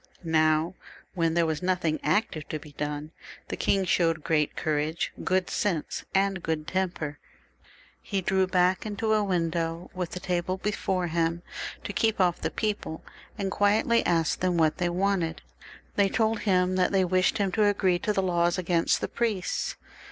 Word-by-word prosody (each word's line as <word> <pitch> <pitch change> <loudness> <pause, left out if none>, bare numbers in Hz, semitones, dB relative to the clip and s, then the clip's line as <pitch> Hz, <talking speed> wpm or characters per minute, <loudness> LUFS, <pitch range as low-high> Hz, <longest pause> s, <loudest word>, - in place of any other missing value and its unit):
Now 155 +1 +2 0.4
when 165 -2 +1
there 170 -1 +3
was 160 0 -1
nothing 180 -4 0
active 155 -2 0
to 155 - -2
be 150 0 -12
done, 150 +1 -4 0.4
the - - -2
king 195 -1 +1
showed 165 -3 +2
great 150 -2 +1
courage, 155 +2 -1
good 185 0 +1
sense, 175 -7 -2
and 195 -1 +2
good 160 -2 -2
temper. 175 -6 -2 0.8
He 200 - -2
drew 190 0 +1
back 185 0 +2
into 220 +1 -1
a 215 -1 +3
win 175 -4 0
dow 165 +1 -3
with 180 -2 -4
a - - -3
table 180 0 -1
before 190 -2 -1
him 165 0 0 0.4
to 205 - -5
keep 220 0 +1
off 180 -2 +2
the - - 0
people, 210 -7 -3 0.3
and 195 -1 -2
quietly 215 +4 +3
asked 165 -3 +1
them 180 -1 +1
what 160 +1 +2
they 175 -1 +1
wanted. 180 -2 0 0.5
They 200 -1 +4
told 220 +1 +1
him 185 0 +3
that 180 - +2
they 190 -2 +3
wished 185 +3 +2
him 200 -3 0
to 210 +3 +2
agree 190 -3 +2
to 210 - 0
the 195 -2 +1
laws 175 -1 +2
against 175 -2 +1
the - - -1
priests. 220 -6 -1
180 Hz, 175 wpm, -27 LUFS, 165-195 Hz, 0.8 s, They